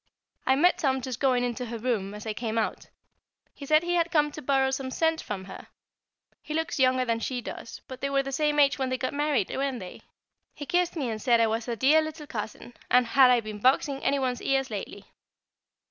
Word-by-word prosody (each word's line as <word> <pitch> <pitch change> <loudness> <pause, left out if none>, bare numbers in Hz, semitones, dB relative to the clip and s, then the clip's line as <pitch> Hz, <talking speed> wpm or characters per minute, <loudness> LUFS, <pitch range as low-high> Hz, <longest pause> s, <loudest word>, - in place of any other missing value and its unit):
I 265 - +5
met 350 +6 +3
Tom 265 -2 +1
just 255 -2 -5
going 255 -3 +2
into 245 0 -3
her 230 +1 -5
room 215 -4 -2
as 210 - -9
I 220 - -2
came 225 0 -3
out; 220 - -2 0.7
he 280 - -10
said 310 +2 +4
he 350 0 -1
had 340 -1 +2
come 300 -3 +2
to 305 - -8
borrow 270 -1 +2
some 265 0 -3
scent 320 +4 0
from 190 -2 -6
her. 190 - -10 0.7
He 305 - -6
looks 320 -2 -2
younger 255 -1 +3
than 230 -1 0
she 250 +2 -3
does, 230 - -8
but 260 -1 -9
they 275 - -1
were 275 0 +1
the 275 - -5
same 295 +2 0
age 280 -1 +4
when 265 -1 0
they 255 - -1
got 255 - -3
married, 290 -7 0
weren't 270 -2 -2
they? 185 -3 -9 0.5
He 290 - -7
kissed 355 +3 0
me 270 -7 -2
and 215 -1 -5
said 235 0 +3
I 230 - +5
was 225 +1 -2
a 235 - -2
dear 285 +7 +4
little 310 0 -6
cousin, 225 -1 -7 0.2
and 250 0 +5
had 260 +2 +5
I 245 -1 +4
been 215 -1 -7
boxing 270 +3 +2
any 280 - +2
one's 255 -2 -1
ears 270 -2 0
lately. 205 -2 -6
260 Hz, 230 wpm, -27 LUFS, 235-285 Hz, 0.7 s, I